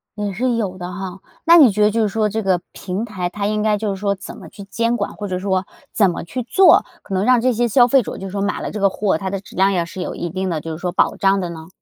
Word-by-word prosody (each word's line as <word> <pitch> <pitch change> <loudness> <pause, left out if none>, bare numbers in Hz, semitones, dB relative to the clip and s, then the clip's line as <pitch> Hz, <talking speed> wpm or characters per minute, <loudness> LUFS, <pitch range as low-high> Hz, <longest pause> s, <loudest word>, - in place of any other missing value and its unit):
也 205 -1 -3
是 245 +4 0
有 200 -5 -2
的 180 0 -6
哈。 190 -1 -6 0.3
那 335 +1 +8
你 275 -10 +7
觉 210 +1 +1
得 210 - +4
就 230 +2 0
是 215 - +2
说 215 +1 0
这 220 +2 -2
个 190 -3 +1
平 190 +3 -4
台 185 -6 -4
它 200 +2 -4
应 210 0 -1
该 215 -1 +2
就 215 0 -2
是 190 - -10
说 200 -1 0
怎 190 - -10
么 - - -11
去 200 - -11
监 230 +4 -1
管？ 205 - -3
或 205 - -5
者 185 -1 -2
说 190 -1 -1 0.3
怎 200 -4 +4
么 170 - -4
去 250 +9 -5
做， 375 +10 +5 0.2
可 195 - -7
能 190 +2 +1
让 255 0 +5
这 255 +1 +2
些 240 +2 +1
消 240 +2 +5
费 270 +2 +4
者 - - -7
就 195 - -6
是 - - -8
说 200 +1 -3
买 200 +1 -1
了 - - -4
这 210 - -5
个 200 0 +3
货， 195 -3 0
它 190 +3 -4
的 195 0 -3
质 - - -15
量 195 +2 +3
也 170 -2 0
是 185 +1 -8
有 - - -4
一 175 - -4
定 185 +2 -3
的 160 -3 -2
就 165 - -6
是 155 - -5
说 180 - -2
保 175 - +1
障 195 0 +2
的 180 -2 -3
呢？ 160 -1 -9
200 Hz, 340 characters per minute, -19 LUFS, 185-220 Hz, 0.3 s, 那